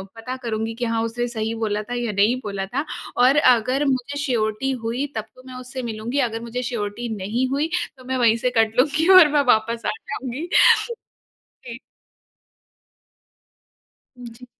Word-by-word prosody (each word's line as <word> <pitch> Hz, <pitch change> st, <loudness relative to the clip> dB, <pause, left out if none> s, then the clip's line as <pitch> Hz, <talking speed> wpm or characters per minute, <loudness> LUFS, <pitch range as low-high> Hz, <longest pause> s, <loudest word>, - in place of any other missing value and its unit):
पता 240 Hz, +3 st, -6 dB
करुँगी 225 Hz, -1 st, -3 dB
कि, 240 Hz, +1 st, -3 dB
"हाँ, 230 Hz, 0 st, 0 dB
उसने 240 Hz, +1 st, -2 dB
सही 225 Hz, -1 st, -3 dB
बोला 210 Hz, 0 st, -1 dB
था -, -, -3 dB
या 240 Hz, -2 st, -2 dB
नहीं 205 Hz, +5 st, +3 dB
बोला 200 Hz, -2 st, -4 dB
था?" 265 Hz, +9 st, -3 dB, 0.3 s
और 255 Hz, +3 st, +5 dB
अगर 255 Hz, +1 st, +3 dB
मुझे 265 Hz, +2 st, -1 dB
श्योरिटी 240 Hz, -2 st, -1 dB
हुई 245 Hz, +5 st, -1 dB
तब 220 Hz, -1 st, -3 dB
तो 255 Hz, -, -16 dB
मैं 255 Hz, -, -9 dB
उससे 255 Hz, +1 st, -7 dB
मिलूँगी, 225 Hz, +6 st, -3 dB
अगर 225 Hz, +1 st, -6 dB
मुझे 240 Hz, +2 st, -4 dB
श्योरिटी 230 Hz, +1 st, -4 dB
नहीं 225 Hz, +7 st, -1 dB
हुई, 290 Hz, +4 st, -1 dB, 0.3 s
तो 255 Hz, -, -15 dB
मैं 260 Hz, 0 st, -2 dB
वहीं 230 Hz, -2 st, +3 dB
से 250 Hz, +2 st, 0 dB
कट 225 Hz, 0 st, +2 dB
लूँगी 305 Hz, +5 st, +2 dB
और 325 Hz, -, +8 dB
मैं 290 Hz, -, +4 dB
वापस 230 Hz, +1 st, -1 dB
आ -, -, +1 dB
जाऊँगी। 280 Hz, -, -5 dB, 1.2 s
जी। 235 Hz, -1 st, -8 dB, 2.5 s
जी। 235 Hz, +2 st, -11 dB
240 Hz, 165 wpm, -22 LUFS, 225-260 Hz, 2.5 s, और